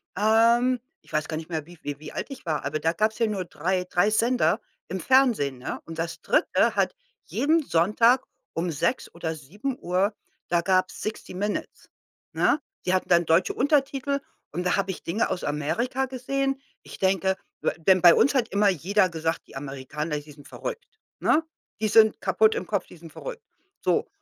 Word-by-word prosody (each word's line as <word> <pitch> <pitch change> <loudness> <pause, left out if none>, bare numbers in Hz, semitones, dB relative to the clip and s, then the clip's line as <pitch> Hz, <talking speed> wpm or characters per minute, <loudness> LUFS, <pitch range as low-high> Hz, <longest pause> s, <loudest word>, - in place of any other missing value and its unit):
ähm 230 +4 +4 0.3
ich - - -18
weiß 155 -1 0
gar 155 - -3
nicht 160 +2 -7
mehr, 160 -3 -3
wie 175 +2 -14
v 160 - -27
wie 145 -1 -4
wie 155 - -9
alt - - -4
ich 275 -7 -9
war, 160 -2 -1
aber 150 +2 -1
da 165 +1 +1
gab's 215 +4 0
ja 230 - +2
nur 200 -4 -2
3- 180 +3 -1
3 180 +3 +2
Sender 235 +3 +2 0.3
im 190 - -3
Fernsehen, 240 - +3
ne? 125 - -5
Und 165 -1 -8
das 165 +1 -4
3. - - +2
hat - - +1 0.3
jeden 315 +3 +2
Sonntag 230 - +3 0.3
um 170 +2 -1
6 170 - -1
oder 165 -1 -3
7:00 190 - -2 0.4
da 175 -1 +3
gab's 185 +1 +1
Sixty 215 -3 -5
Minutes, 205 +3 -4 0.4
ne? 300 - +3 0.3
Die 185 - +1
hatten 185 - 0
dann 175 -1 +5
deutsche 165 +3 +2
Untertitel 280 0 +1 0.3
und 180 +4 -3
da - - +3
habe 195 -1 0
ich 185 - -8
Dinge 200 +7 0
aus 180 - -3
Amerika 230 - -1
gesehen. 270 +1 -2 0.2
Ich - - -11
denke 190 0 +2 0.2
we - - +1
denn 185 +3 +4
bei 175 -1 +10
uns 280 - +3
hat 245 -4 +2
immer 200 +1 +3
jeder 190 +3 +2
gesagt: 160 0 -3
„Die - - -15
Amerikaner, 145 +3 -4
die 150 0 -13
sind 145 -1 -15
verrückt“, - - -6 0.3
ne? 315 - +3 0.4
„Die 215 - +1
sind 220 0 +5
kaputt 220 0 +3
im - - -3
Kopf. 200 -4 -1
Die - - -14
sind 165 0 -12
verrückt.“ - - -7 0.4
So, - - +1
190 Hz, 190 wpm, -26 LUFS, 165-235 Hz, 0.4 s, bei